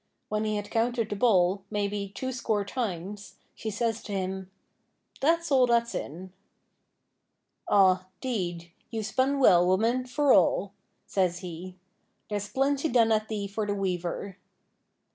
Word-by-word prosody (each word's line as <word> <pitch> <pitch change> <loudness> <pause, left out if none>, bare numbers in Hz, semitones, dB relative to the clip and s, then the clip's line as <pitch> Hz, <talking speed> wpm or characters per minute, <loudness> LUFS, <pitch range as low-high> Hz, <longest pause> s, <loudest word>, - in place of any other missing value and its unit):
When 215 0 -1
he 215 0 0
had 205 0 -4
counted 230 -1 0
the - - -1
ball, 195 -3 +3
maybe, 205 -1 -2
two 260 0 -3
score 220 -5 -1
times, 200 -3 -4 0.2
she 220 - -5
says 225 +1 -1
to 210 - -7
him: 190 -1 -3 0.7
'That's 335 +3 +1
all 260 -2 +5
that's 235 0 +2
in.' 180 +5 -6 1.4
'Aw, 190 -2 +5 0.2
'deed, 175 -9 -3 0.2
you've 220 -2 -3
spun 260 +6 +1
well, 180 -9 +6
woman, 230 +7 +2
for 285 +1 +3
all,' 190 +2 +3 0.3
says 180 -2 0
he; 180 0 -7 0.6
'there's 205 -1 -2
plenty 275 +6 +1
done 230 -3 +4
at 215 0 +2
thee 210 -2 -3
for 210 +2 -3
the 205 - 0
weaver.' 185 0 -3
205 Hz, 145 wpm, -28 LUFS, 190-235 Hz, 1.4 s, well